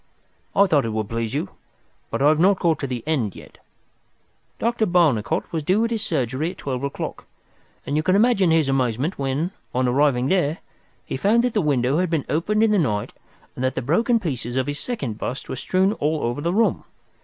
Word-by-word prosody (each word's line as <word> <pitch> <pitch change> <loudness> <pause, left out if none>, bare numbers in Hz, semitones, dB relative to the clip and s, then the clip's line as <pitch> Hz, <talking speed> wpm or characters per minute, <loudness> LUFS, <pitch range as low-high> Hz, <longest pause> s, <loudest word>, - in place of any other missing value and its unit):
"I 200 - +6
thought 150 -7 +3
it 115 - -3
would 110 -2 -2
please 115 +1 -3
you. 145 - -2 0.6
But - - -1
I 145 - +6
have 155 0 +3
not 190 +3 +4
got 170 -3 +1
to 140 - -3
the 125 -3 -4
end 135 -10 -1
yet. - - -14 1.0
Dr. 230 -1 0
Barnicot 160 - +1
was 160 - -1
due 190 +9 +2
at 230 - -3
his 225 -2 -1
surgery 145 - -1
at 185 - -9
twelve 130 -3 -4
o'clock, 140 0 -5 0.6
and 145 - -2
you 155 - +2
can 185 +4 +2
imagine 205 -4 +4
his 160 -3 +3
amazement 135 - 0
when, 140 +6 -1 0.2
on 130 0 +2
arriving 130 -1 +2
there, 165 0 +1 0.5
he - - -4
found 220 - +3
that 250 -2 0
the 210 - +2
window 140 -1 +1
had 180 -1 +1
been 160 -4 -1
opened 210 +8 +1
in 225 - +3
the 210 - +3
night 105 -10 -1 0.4
and 125 - -5
that 130 - 0
the - - -1
broken 225 - +2
pieces 125 - -4
of 130 -1 +1
his 145 +1 -4
second 135 - -4
bust 130 - -4
were - - -4
strewn 190 - +1
all 155 -4 -1
over 120 +4 -2
the 170 +3 0
room. 225 +5 +1
150 Hz, 210 wpm, -23 LUFS, 130-185 Hz, 1.0 s, I